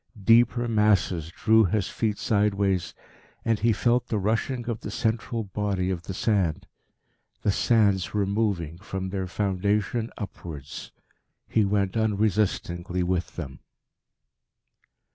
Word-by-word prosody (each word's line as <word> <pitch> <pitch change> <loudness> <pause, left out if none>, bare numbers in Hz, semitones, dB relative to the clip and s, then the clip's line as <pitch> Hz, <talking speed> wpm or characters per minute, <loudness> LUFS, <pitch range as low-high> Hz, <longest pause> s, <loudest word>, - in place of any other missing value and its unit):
Deeper 120 +2 +4
masses 100 -7 +2
drew 110 +5 +4
his 95 +1 0
feet 105 -3 -1
sideways, 100 -5 +1 0.5
and 115 -2 +2
he 115 +2 +3
felt 120 +4 +1
the 110 - -1
rushing 115 +4 -1
of 115 -2 -2
the - - -6
central 115 +1 -1
body 95 -2 -1
of 90 -3 -3
the 95 +3 -6
sand. 95 -8 0 0.8
The 105 - +3
sands 100 -4 +2
were 105 -1 +1
moving, 95 -6 -1
from 95 -1 -5
their 95 -1 -3
foundation 100 +4 0
upwards. 80 - -7 0.6
He 110 -2 +2
went 100 0 0
unresistingly 100 -4 0
with 90 0 -1
them. 70 -6 -7
100 Hz, 125 wpm, -26 LUFS, 95-110 Hz, 0.8 s, Deeper